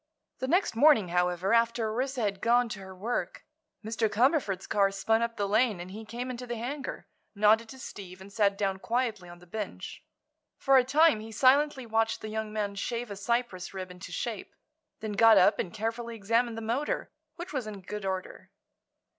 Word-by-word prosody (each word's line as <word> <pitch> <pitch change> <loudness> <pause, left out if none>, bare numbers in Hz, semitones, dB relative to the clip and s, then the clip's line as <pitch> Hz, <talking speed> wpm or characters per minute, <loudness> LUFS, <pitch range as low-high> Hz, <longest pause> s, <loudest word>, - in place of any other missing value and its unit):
The 260 - -2
next 355 - +2
morning, 235 - +5
however, 180 +3 +1
after 230 -1 +2
Orissa 260 +2 -2
had 200 -3 -1
gone 240 +1 +3
to 215 -2 -6
her 190 -1 -10
work, 220 +6 -3 0.4
Mr. 220 0 0
Cumberford's 215 - +1
car 200 -1 +2
spun 195 +3 +1
up 235 0 -2
the 200 - 0
lane 215 -1 +2
and 180 +1 -8
he 220 +3 -8
came 240 +4 -5
into 250 0 -7
the 240 - -3
hangar, 260 +5 -5 0.3
nodded 215 +2 +4
to 265 - -10
Steve 185 -7 -9
and 195 +1 -13
sat 200 -1 +2
down 195 -2 -1
quietly 225 -5 -2
on 175 - -11
the 175 - -17
bench. 210 +4 -6 0.5
For 270 -1 +4
a 255 - +6
time 295 -1 +4
he 220 +1 -9
silently 265 +3 +3
watched 225 0 0
the 215 - -6
young 220 0 -3
man 210 -2 -2
shave 230 +3 -4
a - - -4
Cyprus 200 -3 -2
rib 185 -1 -5
into 180 +2 -10
shape; - - -5 0.5
then 215 -1 -4
got 220 +1 +6
up 185 - +5
and 175 - -2
carefully 230 +2 -4
examined 230 +2 0
the - - -4
motor, 240 +7 -2 0.2
which 345 -1 -8
was 255 -6 -2
in 205 -2 -7
good 210 +3 -6
order. 190 -1 -5
220 Hz, 195 wpm, -29 LUFS, 195-240 Hz, 0.5 s, a